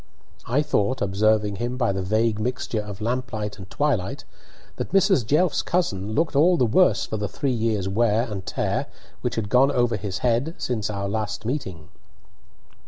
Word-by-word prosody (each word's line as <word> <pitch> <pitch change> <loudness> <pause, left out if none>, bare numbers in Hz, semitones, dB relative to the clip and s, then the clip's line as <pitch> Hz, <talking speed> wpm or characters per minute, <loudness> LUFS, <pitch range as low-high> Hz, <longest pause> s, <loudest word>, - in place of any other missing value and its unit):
I 135 +6 +2
thought, 130 -3 0
observing 105 +1 +1
him 120 +3 -3
by 120 -5 +1
the 95 0 -2
vague 110 +3 +1
mixture 115 -1 -2
of 105 -1 -8
lamplight 110 -3 -3
and 95 -1 -10
twilight, 125 -10 -1 0.5
that - - -5
Mrs. 195 - +4
Jelf's 150 - +2
cousin 110 - -1
looked 160 -1 +1
all 170 +5 +5
the 125 - +3
worse 180 +12 +3
for 110 - -4
the 105 0 -2
three 140 - -1
years' 110 -5 0
wear 110 +2 +2
and 105 -6 -5
tear - - -2 0.3
which - - -2
had 110 -2 -2
gone 130 +4 +5
over 120 -4 +1
his 100 -1 -4
head 125 +8 +1
since 115 -4 -2
our 100 -1 -3
last 105 +1 -3
meeting. 95 - -4
115 Hz, 170 wpm, -24 LUFS, 105-130 Hz, 0.5 s, all